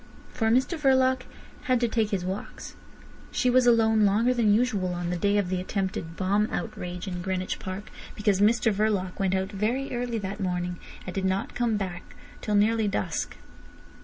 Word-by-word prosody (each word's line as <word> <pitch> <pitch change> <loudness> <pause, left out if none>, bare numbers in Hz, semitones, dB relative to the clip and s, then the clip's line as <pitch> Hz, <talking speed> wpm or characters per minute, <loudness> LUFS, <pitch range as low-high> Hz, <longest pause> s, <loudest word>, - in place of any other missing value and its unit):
For 225 -3 +1
Mr 260 +8 +2
Verloc 260 -2 +3 0.4
had 255 -1 +3
to 240 - +2
take 220 -2 0
his 195 -4 -2
walks. 190 +2 -6 0.6
She 250 - +2
was 250 0 +4
alone 220 -2 +4
longer 215 +5 +3
than 230 -4 +3
usual 205 -5 +1
on 175 0 -3
the - - 0
day 200 +4 +2
of 200 -3 0
the 185 -1 -1
attempted 185 -4 -3
bomb 200 +3 +1
outrage 180 +1 -5
in 180 -2 -4
Greenwich 185 0 -2
Park, 190 +2 -6 0.2
because 205 -2 +1
Mr 225 +1 +4
Verloc 200 -3 0
went 190 -1 +1
out 190 +1 -1
very 235 +7 -1
early 240 -1 -2
that 200 0 -4
morning 180 -2 -2 0.3
and 185 - -5
did 190 -1 -2
not 190 +1 -1
come 235 -3 +1
back 185 -3 -6 0.3
till 210 - -1
nearly 215 +1 +3
dusk. 200 - -2
205 Hz, 180 wpm, -27 LUFS, 185-230 Hz, 0.6 s, was